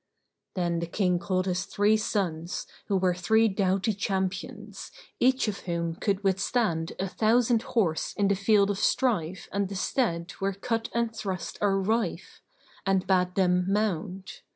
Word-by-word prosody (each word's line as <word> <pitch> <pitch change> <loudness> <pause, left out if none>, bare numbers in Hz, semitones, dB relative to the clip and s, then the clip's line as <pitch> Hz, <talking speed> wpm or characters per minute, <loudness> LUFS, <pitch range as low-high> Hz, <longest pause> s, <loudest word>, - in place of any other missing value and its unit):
Then 175 -2 0
the 170 - -3
King 180 -1 +1
called 185 +1 -1
his 185 0 -1
three 205 +2 +2
sons, 180 -5 -2 0.2
who 200 - +2
were 185 -1 +2
three 220 +5 +3
doughty 195 +1 +1
champions, 190 -1 -3 0.3
each 260 0 +3
of 200 -2 -2
whom 170 -2 -2
could 195 +4 -1
withstand 190 -3 0
a 190 - 0
thousand 230 +3 +2
horse 190 -10 0
in 200 - +3
the 200 - +3
field 200 +1 +3
of 200 - -3
strife 190 - 0
and 200 -1 -1
the 200 - -5
stead 185 -4 -1
where 195 0 0
cut 225 +4 -2
and 235 -1 0
thrust 190 -4 -4
are 200 -1 +3
rife; 195 -3 -2 0.4
and 195 -1 +1
bade 180 -1 +2
them 180 -1 +3
mount. 190 -2 -2
195 Hz, 155 wpm, -27 LUFS, 180-210 Hz, 0.4 s, three